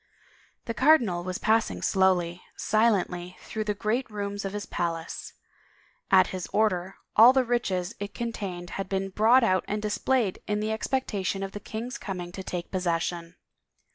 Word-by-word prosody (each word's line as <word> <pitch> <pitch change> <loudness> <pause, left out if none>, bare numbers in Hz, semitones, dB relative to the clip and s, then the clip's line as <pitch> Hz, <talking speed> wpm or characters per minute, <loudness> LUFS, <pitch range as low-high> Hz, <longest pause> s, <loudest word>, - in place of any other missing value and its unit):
The 230 - -3
cardinal 235 - +4
was 185 +1 -3
passing 225 +1 +1
slowly, 180 -2 +2 0.2
silently, 185 -5 +1
through 215 -1 -4
the 210 -1 -1
great 225 +5 -1
rooms 205 -1 -4
of 195 - -3
his 205 0 -4
palace. 165 -1 -4 0.8
At 185 -1 +7
his 185 -2 -4
order, 190 -3 0 0.2
all 235 +4 +9
the 265 -1 +3
riches 210 -6 -1
it 205 0 -6
contained 195 -7 -4
had 195 - -6
been 195 0 -1
brought 225 +6 +5
out 185 -5 +3
and 210 - -1
displayed 215 0 0
in 210 0 0
the 215 +1 -1
expectation 210 -5 -1
of 195 - -4
the 205 - -6
king's 230 +5 -6
coming 180 -3 -5
to 190 - -7
take 180 -2 -5
possession. 170 -1 -2
200 Hz, 160 wpm, -27 LUFS, 180-220 Hz, 0.8 s, all